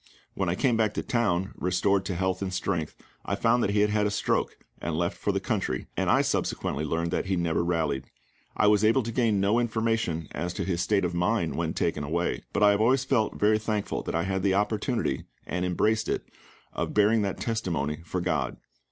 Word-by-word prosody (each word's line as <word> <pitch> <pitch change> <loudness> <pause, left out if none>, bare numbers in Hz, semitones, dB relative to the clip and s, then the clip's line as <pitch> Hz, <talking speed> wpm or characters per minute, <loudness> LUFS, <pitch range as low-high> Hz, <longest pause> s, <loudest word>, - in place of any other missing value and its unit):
When 95 -3 -1
I 85 - +1
came 125 +3 +2
back 110 -2 +1
to - - -2
town, 100 -7 0
restored 95 +2 +1
to 95 - -2
health 95 +2 -1
and 95 -1 -2
strength, 85 -3 -2 0.3
I - - -1
found 120 +2 +2
that - - +1
he 100 0 +2
had 105 0 +3
had 105 -1 +2
a - - 0
stroke, 100 - 0 0.2
and 80 0 -2
left 85 +3 0
for 100 - -1
the 100 - 0
country; 95 - -2
and - - 0
I - - +4
subsequently 75 - -1
learned 85 +2 -1
that 90 - -1
he 95 - +1
never 85 -1 0
rallied. 80 -6 0 0.5
I - - +3
was 105 0 +4
able 115 +4 +4
to 115 - -4
gain 110 -3 +2
no 100 +4 +3
information 110 -8 0
as 85 +4 -3
to - - -2
his 90 -3 -1
state 100 +1 +2
of 90 - -2
mind 90 0 +1
when 80 -1 -2
taken 85 -3 0
away; 85 +4 -1
but 105 - +1
I 105 - +7
have 100 +1 +1
always 125 +4 +3
felt 125 -5 +1
very 110 +1 +4
thankful 105 -1 -2
that - - -4
I 85 - +1
had 95 0 -1
the 95 0 +2
opportunity, 110 +4 0 0.2
and 90 +1 -2
embraced 105 +5 +1
it, - - -1 0.5
of - - -3
bearing 105 +2 +4
that 100 -2 -2
testimony 85 -10 -2
for 90 +2 -3
GOD. - - -1
100 Hz, 220 wpm, -27 LUFS, 85-110 Hz, 0.5 s, I